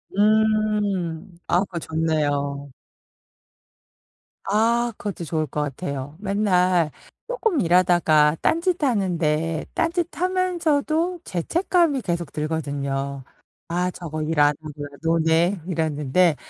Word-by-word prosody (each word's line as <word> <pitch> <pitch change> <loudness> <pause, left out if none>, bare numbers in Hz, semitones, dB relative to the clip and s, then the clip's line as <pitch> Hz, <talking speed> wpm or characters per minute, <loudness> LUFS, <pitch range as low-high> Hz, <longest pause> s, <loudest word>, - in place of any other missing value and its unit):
음. 205 -5 +1
아 175 - +3
그거 180 -3 -5
좋네요. 145 -3 -1 1.7
아. 230 +3 +2
그것도 200 -4 -5
좋을 155 0 -1
것 150 - -3
같아요. 140 0 -4
맨날 185 -5 +2 0.4
쪼끔 450 - 0
일하다가 165 -4 +4
딴짓하는데 185 - 0
딴짓하면서도 345 -1 0
죄책감이 325 - +1
계속 170 -5 -3
들거든요. 140 -3 -3 0.5
'아 180 +1 0
저거 155 -3 -6
일 155 0 -1
안 145 0 +6
하고 155 -1 -7
그냥 145 -1 -7
노네.' 165 +2 +2
이랬는데 160 0 +1
175 Hz, 220 characters per minute, -23 LUFS, 155-215 Hz, 1.7 s, 안